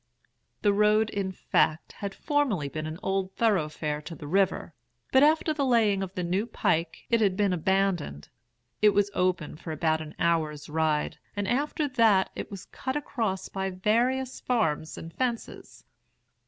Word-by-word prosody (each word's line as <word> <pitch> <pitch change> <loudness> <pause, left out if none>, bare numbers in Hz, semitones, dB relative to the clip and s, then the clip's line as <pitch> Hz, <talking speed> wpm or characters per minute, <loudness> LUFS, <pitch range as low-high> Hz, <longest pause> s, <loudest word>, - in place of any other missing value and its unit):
"The 205 -1 +4
road 210 +1 +3
in 195 -2 -2
fact 160 -3 +1
had 200 -1 -6
formerly 275 - 0
been 155 +1 -4
an 155 +1 -5
old 190 0 -1
thoroughfare 155 -8 0
to 165 +2 -8
the 150 - -9
river, 190 +1 +1 0.4
but 265 - +6
after 310 +1 +4
the 295 -2 -1
laying 225 -6 +3
of 190 -1 -5
the 180 - -2
new 185 +6 0
pike 170 -7 -1
it 230 -1 +4
had 195 -3 +2
been 200 -2 +2
abandoned. 180 - 0 0.5
It 210 -1 +5
was 205 0 +2
open 180 -5 0
for 165 0 -7
about 160 0 +1
an 155 -1 -9
hour's 155 -3 0
ride, 155 -1 0 0.2
and 205 -1 -2
after 290 +5 0
that 225 -7 +3
it - - -5
was 195 -2 -8
cut 260 0 -5
across 225 -10 -2
by 190 0 -3
various 240 +7 0
farms 160 -11 0
and 165 0 -8
fences. 240 0 -4
195 Hz, 165 wpm, -27 LUFS, 160-225 Hz, 0.5 s, but